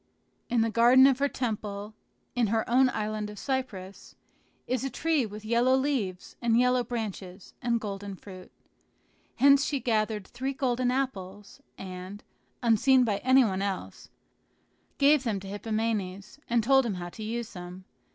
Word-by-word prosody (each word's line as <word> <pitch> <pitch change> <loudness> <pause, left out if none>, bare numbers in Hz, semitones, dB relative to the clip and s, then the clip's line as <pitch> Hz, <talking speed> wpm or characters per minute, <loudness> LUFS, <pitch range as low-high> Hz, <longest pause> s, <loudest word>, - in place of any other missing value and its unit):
In 240 -1 +2
the 225 0 +1
garden 240 +3 +6
of 270 -1 +4
her 285 0 +2
temple, 210 -4 -4 0.4
in 240 -2 +1
her 220 +1 0
own 255 +2 +4
island 215 -2 -3
of 210 - -10
Cyprus, 205 -8 -5 0.5
is 255 -1 -1
a 270 - -1
tree 305 -4 0
with 210 +1 -10
yellow 240 +3 +3
leaves 260 -10 -2
and 235 -1 +2
yellow 250 0 +3
branches 205 -5 -6
and 235 -2 +1
golden 200 -2 -6
fruit. 185 -1 -12 0.8
Hence 280 +1 +5
she 280 -1 -1
gathered 215 -4 0
three 265 +5 -4
golden 255 -2 0
apples, 210 -4 -4 0.2
and, 185 +2 -8 0.4
unseen 250 +3 +4
by 210 -4 0
any 260 +3 +4
one 190 -2 -1
else, 200 -1 -5 0.9
gave 285 0 +4
them 220 -5 -1
to 195 - -10
Hippomenes, 210 0 -3
and 235 -1 +2
told 270 +3 +5
him 225 -5 -2
how 175 -1 -6
to 220 - -11
use 230 +1 -4
them. 180 0 -9
225 Hz, 155 wpm, -28 LUFS, 200-255 Hz, 0.9 s, garden